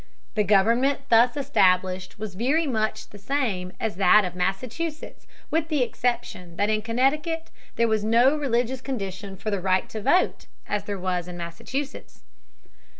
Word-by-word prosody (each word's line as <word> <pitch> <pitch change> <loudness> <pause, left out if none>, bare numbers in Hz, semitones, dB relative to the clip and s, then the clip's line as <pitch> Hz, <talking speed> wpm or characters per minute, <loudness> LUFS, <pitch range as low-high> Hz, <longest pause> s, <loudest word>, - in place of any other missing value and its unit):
The 210 - +2
government 230 +8 +3
thus 240 +4 +5
established 185 -9 +1
was 210 -2 -6
very 270 - +1
much 220 -6 -2
the 205 - -12
same 200 -6 -1
as 220 -5 -2
that 200 +2 +6
of 180 - -4
Massachusetts 240 - -4 0.2
with 320 0 +1
the 300 -5 +1
exception 235 -9 -3
that 205 +4 +1
in 215 0 +1
Connecticut 295 +8 0 0.2
there 235 0 +2
was 220 -2 +1
no 235 +6 +4
religious 255 -3 0
condition 195 -6 -5
for 215 - -4
the 200 -2 -1
right 185 0 +1
to 215 - -6
vote 360 - +2 0.2
as 205 -1 -2
there 205 -1 -3
was 180 -1 -2
in 175 -1 -7
Massachusetts. 215 +12 -6
220 Hz, 155 wpm, -25 LUFS, 190-265 Hz, 0.2 s, that